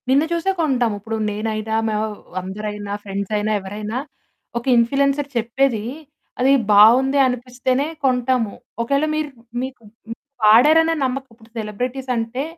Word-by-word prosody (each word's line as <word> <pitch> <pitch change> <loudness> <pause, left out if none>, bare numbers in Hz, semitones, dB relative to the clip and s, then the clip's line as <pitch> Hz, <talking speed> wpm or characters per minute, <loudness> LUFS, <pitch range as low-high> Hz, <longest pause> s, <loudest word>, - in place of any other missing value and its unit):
నిన్ను 280 +4 +4
చూసే 340 +3 0
కొంటాము. 250 -8 +1
ఇప్పుడు 220 +2 -5
నేనైనా, 215 +1 -3
మేవ్ 215 0 0 0.4
అందరైనా, 205 +2 -5
ఫ్రెండ్సయినా, 205 +2 -2
ఎవరైనా 210 +4 -5 0.6
ఒక 235 - -5
ఇన్‌ఫ్లియెన్సర్ 275 +4 +2
చెప్పేదీ, 235 0 0 0.6
అది 260 +2 +4 0.2
బావుంది 245 +7 +6
అనిపిస్తేనే 250 +2 -1 0.2
కొంటాము. 250 -4 +1 0.3
ఒకేళ 280 +5 +1
మీరు 310 -1 -2 0.3
మీకు 260 -2 -7 0.3
హ్మ్. 230 - -6 0.3
వాడారనే 300 +10 +6
నమ్మక 265 +1 -2
ఉప్పుడు 225 0 -20
సెలెబ్రిటీసంటే, 245 +3 -3
240 Hz, 115 wpm, -21 LUFS, 215-270 Hz, 0.6 s, బావుంది